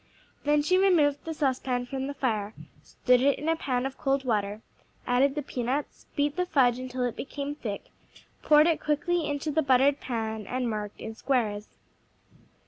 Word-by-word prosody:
Then 295 Hz, 0 st, +3 dB
she 365 Hz, +4 st, +3 dB
removed 315 Hz, -7 st, +3 dB
the 325 Hz, -, -3 dB
saucepan 260 Hz, -3 st, 0 dB
from 265 Hz, +1 st, -4 dB
the 285 Hz, -, -5 dB
fire, 220 Hz, -6 st, -1 dB, 0.3 s
stood 250 Hz, -1 st, +2 dB
it 280 Hz, +1 st, +3 dB
in 300 Hz, -, -5 dB
a 325 Hz, -, +3 dB
pan 255 Hz, -5 st, -1 dB
of 270 Hz, 0 st, -5 dB
cold 275 Hz, -1 st, 0 dB
water, 210 Hz, -2 st, -1 dB, 0.4 s
added 265 Hz, +3 st, +2 dB
the 295 Hz, -, -2 dB
peanuts, 260 Hz, +3 st, -3 dB
beat 290 Hz, +2 st, 0 dB
the 360 Hz, -, +1 dB
fudge 255 Hz, -6 st, +3 dB
until 255 Hz, 0 st, -4 dB
it 245 Hz, -2 st, -1 dB
became 285 Hz, +1 st, -5 dB
thick, 220 Hz, -9 st, -5 dB, 0.6 s
poured 300 Hz, 0 st, +6 dB
it 330 Hz, -1 st, +1 dB
quickly 315 Hz, +3 st, 0 dB
into 290 Hz, +1 st, -2 dB
the 315 Hz, +2 st, +2 dB
buttered 275 Hz, 0 st, +3 dB
pan 220 Hz, -4 st, -4 dB
and 250 Hz, -1 st, -2 dB
marked 210 Hz, -2 st, -4 dB
in 225 Hz, -, -6 dB
squares. 220 Hz, -4 st, -2 dB
265 Hz, 175 wpm, -27 LUFS, 245-290 Hz, 0.6 s, poured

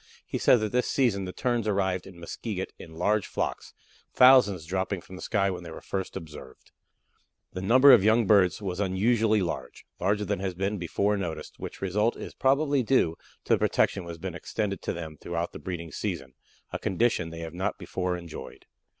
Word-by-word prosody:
He -, -, -3 dB
says 120 Hz, -, +5 dB
that 110 Hz, -1 st, -1 dB
this 125 Hz, 0 st, +1 dB
season 110 Hz, -8 st, +1 dB
the 90 Hz, -, -5 dB
Terns 120 Hz, 0 st, -1 dB
arrived 95 Hz, -3 st, 0 dB
at 95 Hz, -, -12 dB
Muskeget 95 Hz, +3 st, -5 dB
in 80 Hz, -, -11 dB
large 105 Hz, +5 st, +1 dB
flocks, -, -, -3 dB, 0.4 s
thousands 115 Hz, -10 st, +6 dB
dropping 95 Hz, +2 st, -2 dB
from 95 Hz, -, -12 dB
the 90 Hz, -, -9 dB
sky 100 Hz, -3 st, +1 dB
when 90 Hz, -, -5 dB
they 85 Hz, -, -9 dB
were 80 Hz, -, -8 dB
first 95 Hz, 0 st, -4 dB
observed. 75 Hz, -7 st, -11 dB, 0.8 s
The 95 Hz, -, -4 dB
number 130 Hz, +7 st, +7 dB
of 115 Hz, -6 st, +6 dB
young 110 Hz, +2 st, +4 dB
birds 100 Hz, -1 st, +4 dB
was 90 Hz, -2 st, -3 dB
unusually 105 Hz, +2 st, +2 dB
large, 85 Hz, -, -5 dB
larger 105 Hz, +3 st, +1 dB
than 90 Hz, -, -1 dB
has 95 Hz, -2 st, -3 dB
been 100 Hz, +2 st, -2 dB
before 100 Hz, +4 st, 0 dB
noticed, 85 Hz, -5 st, -5 dB
which -, -, -7 dB
result 105 Hz, +5 st, +1 dB
is -, -, -7 dB
probably 140 Hz, +1 st, +2 dB
due 110 Hz, -9 st, +2 dB, 0.3 s
to -, -, +2 dB
the -, -, +3 dB
protection 95 Hz, -, +1 dB
which 85 Hz, 0 st, -7 dB
has -, -, -10 dB
been 90 Hz, +1 st, -5 dB
extended 100 Hz, +3 st, -3 dB
to -, -, -2 dB
them 80 Hz, -3 st, -7 dB
throughout 85 Hz, 0 st, -3 dB
the -, -, -9 dB
breeding 85 Hz, -3 st, -6 dB
season, 65 Hz, -2 st, -4 dB, 0.4 s
a -, -, -2 dB
condition 95 Hz, -4 st, +1 dB
they 85 Hz, 0 st, -8 dB
have 80 Hz, -1 st, -6 dB
not 90 Hz, +2 st, -2 dB
before 90 Hz, -1 st, -2 dB
enjoyed. 85 Hz, -3 st, -9 dB
95 Hz, 195 wpm, -27 LUFS, 85-110 Hz, 0.8 s, number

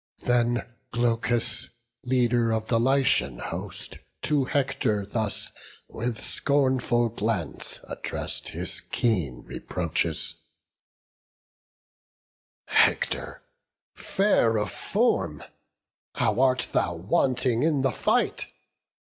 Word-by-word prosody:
Then 120 Hz, -1 st, +1 dB, 0.2 s
Glaucus, 120 Hz, 0 st, 0 dB, 0.4 s
leader 120 Hz, -2 st, +2 dB
of 110 Hz, 0 st, -1 dB
the 115 Hz, -1 st, +3 dB
Lycian 125 Hz, -, +2 dB
host, -, -, -6 dB, 0.2 s
To 145 Hz, -3 st, +2 dB
Hector 130 Hz, -7 st, 0 dB
thus, 105 Hz, 0 st, -3 dB, 0.4 s
with 115 Hz, 0 st, -3 dB
scornful 130 Hz, -4 st, +1 dB
glance, 105 Hz, -5 st, -3 dB
address'd -, -, -5 dB
His -, -, -5 dB
keen 85 Hz, -, -1 dB
reproaches: 80 Hz, 0 st, -3 dB, 2.3 s
"Hector, -, -, +2 dB, 0.5 s
fair 155 Hz, -, +2 dB
of 105 Hz, -4 st, -1 dB
form, 75 Hz, -2 st, 0 dB, 0.7 s
How -, -, +1 dB
art 130 Hz, -1 st, +3 dB
thou 85 Hz, -, +1 dB
wanting 120 Hz, +7 st, +1 dB
in 150 Hz, -3 st, +2 dB
the 135 Hz, -, +3 dB
fight! -, -, +1 dB
120 Hz, 90 wpm, -26 LUFS, 105-130 Hz, 2.3 s, the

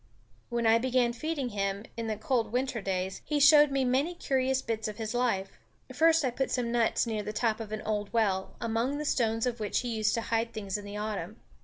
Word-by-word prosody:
When 235 Hz, -1 st, -1 dB
I 225 Hz, +1 st, +5 dB
began 250 Hz, -1 st, +1 dB
feeding 290 Hz, 0 st, -3 dB
him, 200 Hz, 0 st, -2 dB
in 230 Hz, -1 st, -4 dB
the 220 Hz, -, -1 dB
cold 225 Hz, 0 st, 0 dB
winter 250 Hz, -1 st, -1 dB
days, 190 Hz, -1 st, -2 dB
he 300 Hz, -1 st, -1 dB
showed 295 Hz, 0 st, +7 dB
me 275 Hz, -1 st, +1 dB
many 275 Hz, +8 st, +1 dB
curious 265 Hz, -4 st, 0 dB
bits 225 Hz, -1 st, -2 dB
of 210 Hz, -, -6 dB
his 220 Hz, 0 st, -4 dB
life. 210 Hz, -6 st, -1 dB, 0.3 s
First 320 Hz, +1 st, +4 dB
I 255 Hz, -, +1 dB
put 265 Hz, +2 st, -2 dB
some 240 Hz, -2 st, -1 dB
nuts 235 Hz, 0 st, +2 dB
near 220 Hz, -2 st, -2 dB
the 210 Hz, -, -4 dB
top 220 Hz, 0 st, 0 dB
of 220 Hz, -2 st, -7 dB
an 215 Hz, 0 st, -4 dB
old 210 Hz, -1 st, -2 dB
well, 195 Hz, -5 st, 0 dB
among 235 Hz, +4 st, -1 dB
the 300 Hz, -, -4 dB
stones 225 Hz, -4 st, +1 dB
of 245 Hz, -2 st, -2 dB
which 210 Hz, -2 st, 0 dB
he 240 Hz, -2 st, -3 dB
used 215 Hz, -1 st, +1 dB
to 230 Hz, -, -1 dB
hide 230 Hz, 0 st, -1 dB
things 200 Hz, -4 st, -4 dB
in 205 Hz, -1 st, -4 dB
the 205 Hz, +1 st, -6 dB
autumn. 210 Hz, 0 st, -4 dB
230 Hz, 225 wpm, -29 LUFS, 215-255 Hz, 0.3 s, showed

